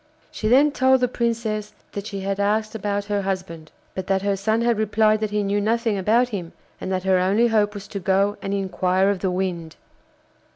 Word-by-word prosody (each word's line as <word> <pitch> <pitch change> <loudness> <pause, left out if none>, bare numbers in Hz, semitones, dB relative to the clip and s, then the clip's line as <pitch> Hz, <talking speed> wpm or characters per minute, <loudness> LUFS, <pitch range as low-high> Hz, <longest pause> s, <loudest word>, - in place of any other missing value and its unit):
She 215 - -3
then 275 +6 +5
told 260 -1 +3
the 250 - +2
Princess 230 -3 -2 0.2
that 200 +1 -6
she 200 -3 -5
had 195 +1 -2
asked 215 +2 0
about 205 -1 -2
her 205 -1 -1
husband, 185 -5 -5 0.2
but 190 -1 -5
that 195 -1 +1
her 200 0 +1
son 220 +4 0
had 235 -2 +1
replied 215 0 +2
that 215 -1 -1
he 210 0 -1
knew 200 +1 0
nothing 225 +1 +1
about 225 +6 +2
him, 180 -7 -5 0.3
and 190 - -4
that 185 -1 -1
her 190 -1 +3
only 205 +6 +3
hope 210 -2 +1
was 205 0 -8
to 200 - -4
go 195 +3 +1
and 195 - -4
inquire 190 0 +1
of 200 - -3
the 190 - -1
Wind. 180 -3 -3
205 Hz, 210 wpm, -23 LUFS, 190-220 Hz, 0.3 s, then